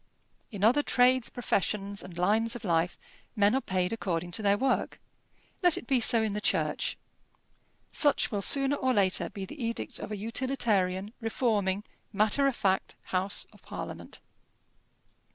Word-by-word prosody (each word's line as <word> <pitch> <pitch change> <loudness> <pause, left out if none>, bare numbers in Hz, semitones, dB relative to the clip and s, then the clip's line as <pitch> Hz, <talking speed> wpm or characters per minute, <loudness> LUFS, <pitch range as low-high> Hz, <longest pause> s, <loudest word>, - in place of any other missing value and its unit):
In 205 -3 -5
other 250 +7 +5
trades, 255 -2 +3
professions, 200 -3 -2
and 180 -2 -11
lines 220 +6 +2
of 240 - -8
life, 170 -2 0 0.4
men 205 +1 +3
are 265 - +1
paid 185 -1 -1
according 175 -5 -3
to 200 - -1
their 200 -1 +3
work. 265 +3 -1 0.6
Let 355 -3 +5
it - - -6
be 260 0 +2
so 230 -1 +4
in 215 -2 -1
the 210 - -3
Church. - - 0 0.9
Such 290 -3 +2
will 205 -2 -1
sooner 275 +6 +4
or 260 -1 0
later 185 -4 +2
be 195 -1 -7
the 280 +6 -8
edict 230 0 -3
of - - -7
a 210 - -3
utilitarian, 210 -4 0
reforming, 210 -4 0 0.3
matter 215 +7 +3
of 270 - 0
fact 190 -4 0 0.2
House 185 +2 0
of - - -19
Parliament. - - -8
210 Hz, 155 wpm, -29 LUFS, 190-245 Hz, 0.9 s, other